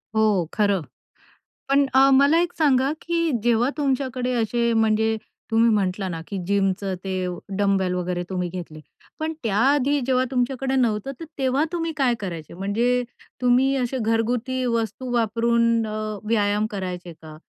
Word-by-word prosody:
हो 220 - +4 0.3
खरं. 200 -4 +2 0.9
पण 275 0 +4
अ, 270 +1 +6
मला 280 +4 +5
एक 350 0 -2
सांगा, 275 -2 +3
की 335 -1 0
जेव्हा 240 +2 +2
तुमच्याकडे 260 -3 -1
अशे, 235 +1 +1
म्हणजे 220 0 +2 0.3
तुम्ही 225 +1 +4
म्हटला 190 -1 -1
ना, 165 -2 -5
की 200 - -4
जिमचं 195 -1 0
ते 185 -1 -2 0.3
डंबेल 195 -2 +1
वगैरे 180 0 -2
तुम्ही 180 -1 -2
घेतले, 170 -3 -8 0.4
पण 315 +1 -2
त्याआधी 270 +6 +2
जेव्हा 255 -1 +2
तुमच्याकडे 265 +1 -1
नव्हतं, 235 0 0
तर 330 - -5
तेव्हा 265 +2 +1
तुम्ही 330 -1 -2
काय 260 -4 +2
करायचे? 170 -6 -6
म्हणजे 230 +7 0 0.4
तुम्ही 255 +2 +3
अशे 260 0 -1
घरगुती 235 +3 0
वस्तू 230 +1 -2
वापरून 230 0 +2
अ, 215 -1 -4
व्यायाम 210 -1 +2
करायचे 180 -2 -5
का? 155 -1 -13
230 Hz, 145 wpm, -23 LUFS, 200-260 Hz, 0.9 s, अ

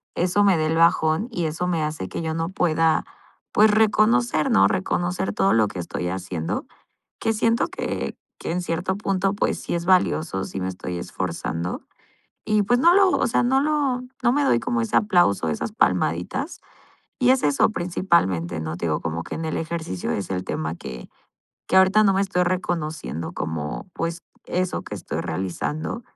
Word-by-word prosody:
eso 185 +4 +2
me 195 -4 +4
da 155 - +1
el 160 +1 0
bajón 165 +4 +3
y 175 -6 -2
eso 165 +3 -2
me 165 -3 0
hace 150 -11 -4
que - - -4
yo 160 0 -2
no 165 +1 -2
pueda, 165 -3 +2 0.5
pues, 215 +1 +5
reconocer, 215 -4 +3
¿no? 95 0 +6
Reconocer 175 - -1
todo 195 - +2
lo 110 -2 +4
que 95 -3 -7
estoy 90 +1 -3
haciendo, 90 -3 -3 0.5
que 225 - +1
siento 230 +3 +2
que - - -4 0.3
que - - -3
en 180 +1 -1
cierto 180 +2 -2
punto, 195 -1 0
pues, 205 - -1
sí - - -3
es 170 - -2
valioso, 160 - +2
sí 95 - -6
me 95 - -1
estoy 90 -1 -5
esforzando. 85 -1 -4 0.6
Y, 215 -1 +2
pues, 245 +4 +3
no 340 +3 +6
lo, 390 -1 +5
o - - +2
sea, 240 - +2
no 265 +2 +3
lo 285 -4 0 0.2
no 240 - +4
me 290 0 +2
doy 120 - +3
como 120 -1 -1
ese 115 - -1
aplauso, 175 - +3
esas 75 - -3
palmaditas. 90 - 0 0.6
Y 250 0 +5
es 260 - +2
eso 145 +8 +3
principalmente, 95 - 0
¿no? 80 +1 -4
Te 85 - -3
digo, 75 - -1
como 80 0 -3
que - - -6
en 165 - -4
el 160 - -2
ejercicio 160 - -3
es 100 - -3
el 90 -1 -2
tema 80 +1 -3
que 65 -6 -9 0.6
que - - +2
ahorita 190 +3 +6
no 195 - +4
me 195 - +2
estoy 185 -2 +1
reconociendo 155 - -3
como, 75 - -4
pues, 165 0 -3 0.2
eso 185 0 -2
que - - -7
estoy - - -5
realizando, 95 - -3
165 Hz, 185 wpm, -23 LUFS, -, 0.6 s, no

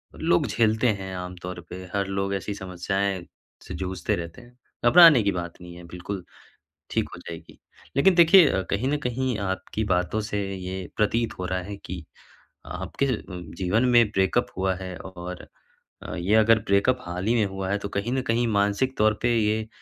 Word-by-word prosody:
लोग - - +2
झेलते 110 +1 +2
हैं 95 0 -6
आमतौर 90 0 -6
पे, 95 +1 -7
हर 100 -1 0
लोग 95 0 -2
ऐसी 100 +2 -3
समस्याएँ 95 0 -2 0.4
से - - -8
जूझते 95 -2 -2
रहते 85 +7 -7
हैं, 120 +1 -19 0.3
घबराने 165 -1 +8
की 100 - +2
बात 85 -2 -4
नहीं 90 0 -10
है 85 - -11
बिल्कुल 90 +2 -6 0.7
ठीक - - 0
हो - - -10
जाएगी। 80 -1 -9 0.4
लेकिन 180 +6 +5
देखिए 165 - +6
कहीं 110 +7 0
न 150 - +1
कहीं 125 -1 -1
आपकी 100 +2 -3
बातों 90 +2 0
से 105 -1 -3 0.2
ये 95 0 -5
प्रतीत 110 +2 +1
हो 90 - -2
रहा 95 0 -1
है 100 +2 -6
कि 90 -4 -8 0.6
आपके 140 - -3
अ, 135 - +1 0.2
जीवन 90 +6 -1
में 120 -1 +6
ब्रेकअप 95 -2 +1
हुआ 95 0 +1
है 95 0 -7
और 90 -1 -8 0.6
अ, - - -6
ये 90 +6 +1
अगर 110 0 +5
ब्रेकअप 100 +6 +3
हाल 90 -1 -5
ही 115 - +3
में 110 - +3
हुआ 95 -1 -4
है, 100 - +1
तो 100 0 -6
कहीं 100 +5 -2
न 130 - +1
कहीं 120 -1 0
मानसिक 105 +5 +1
तौर 110 0 +4
पे 120 -1 +2
ये 110 0 +1
100 Hz, 185 wpm, -25 LUFS, 90-115 Hz, 0.7 s, घबराने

